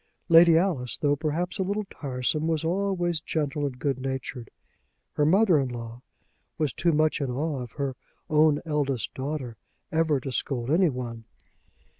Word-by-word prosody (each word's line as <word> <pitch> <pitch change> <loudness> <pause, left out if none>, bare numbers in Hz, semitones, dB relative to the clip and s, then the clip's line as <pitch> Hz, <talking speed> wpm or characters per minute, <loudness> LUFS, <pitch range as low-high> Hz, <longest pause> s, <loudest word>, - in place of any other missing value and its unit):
Lady 165 0 +8
Alice, 160 - 0
though 145 -2 +2
perhaps 160 +6 -2
a - - +2
little 200 +2 -2
tiresome, 140 +3 -2
was 160 -2 0
always 175 -2 0
gentle 150 -2 -1
and 130 -3 -7
good 135 -1 -1
natured. 130 -2 -5 0.6
Her 150 - +2
mother 185 -2 +5
in 135 -2 -1
law 120 0 -7 0.6
was 155 -4 0
too 170 - +1
much 155 0 +2
in 135 - -1
awe 140 +2 -2
of 120 -1 -8
her 140 -3 -3 0.3
own 150 -1 +4
eldest 140 -7 -1
daughter 130 -4 -4 0.3
ever 160 -3 +2
to 130 +1 -5
scold 125 0 -2
anyone. 125 -10 0
150 Hz, 155 wpm, -26 LUFS, 130-165 Hz, 0.6 s, Lady